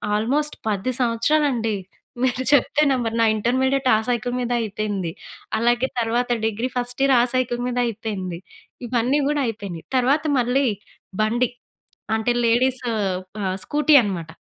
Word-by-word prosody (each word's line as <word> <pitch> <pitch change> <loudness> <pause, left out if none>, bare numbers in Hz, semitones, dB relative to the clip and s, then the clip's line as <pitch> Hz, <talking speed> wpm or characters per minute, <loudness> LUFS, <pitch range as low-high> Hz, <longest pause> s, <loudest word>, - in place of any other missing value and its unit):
Almost 280 +8 0
10 210 +4 0
సంవత్సరాలండి, 235 -1 +1 0.5
మీరు 260 0 +1
చెప్తే 290 +1 +3
నమ్మరు, 235 -4 -1
నా - - +5
ఇంటర్మీడియేట్ 260 +4 +1
ఆ - - +4
సైకిల్ 245 0 -1
మీదే 245 0 -1
అయిపోయింది. 205 -4 -3 0.5
అలాగే 240 +3 +2
తర్వాత 235 +2 0 0.2
డిగ్రీ 225 +3 -1
ఫస్ట్ 245 +1 -3
ఇయర్ 275 -1 +4
ఆ - - +5
సైకిల్ 245 -1 0
మీదే 245 0 0
అయిపోయింది. 200 -6 -4 0.5
ఇవన్నీ 250 +4 +1
గూడా 295 -1 +1
అయిపోయినయి. 200 -7 -6
తర్వాత 275 +4 +2 0.2
మళ్ళీ, 250 +3 +2 0.6
బండి. 235 +3 +1 0.7
అంటే 220 +2 0
లేడీస్ 255 +2 +2
ఆహ్, 190 -1 -2
స్కూటీ 300 0 +3
అనమాట. 180 -6 -4
240 Hz, 135 wpm, -22 LUFS, 215-260 Hz, 0.7 s, నా